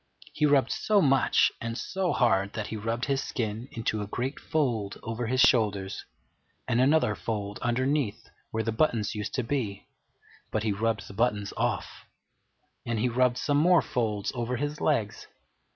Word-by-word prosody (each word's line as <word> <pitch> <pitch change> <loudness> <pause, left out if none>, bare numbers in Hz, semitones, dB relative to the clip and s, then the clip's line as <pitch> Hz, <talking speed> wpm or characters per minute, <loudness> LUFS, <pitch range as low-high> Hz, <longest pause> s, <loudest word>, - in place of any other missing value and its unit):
He 150 - +2
rubbed 140 -2 +3
so 210 -1 +2
much 135 -7 +4
and 115 0 -3
so 190 +3 -1
hard 100 -4 +2
that 110 - -3
he - - -4
rubbed 115 +3 -2
his 140 -1 0
skin 110 0 -3
into 110 -2 -2
a 100 - -4
great 125 +6 -3
fold 120 -11 -1
over 115 +1 -3
his 130 +2 +2
shoulders, 105 -7 +2 0.6
and 125 -1 +2
another 140 -4 +3
fold 105 -2 -4
underneath, 130 0 0 0.2
where 110 0 -2
the 115 - -1
buttons 110 -3 +1
used 105 -1 -4
to 130 - 0
be 115 -6 -3 0.6
(but 110 - -1
he 110 - +1
rubbed 105 -1 -1
the - - -10
buttons 105 -2 0
off), - - -2 0.8
and 115 -1 -2
he 120 +4 +1
rubbed 125 +1 +2
some 145 +2 +1
more 175 +3 +5
folds 105 -4 -1
over 120 0 -2
his 145 +3 -3
legs. 115 -9 0
115 Hz, 170 wpm, -28 LUFS, 105-135 Hz, 0.8 s, more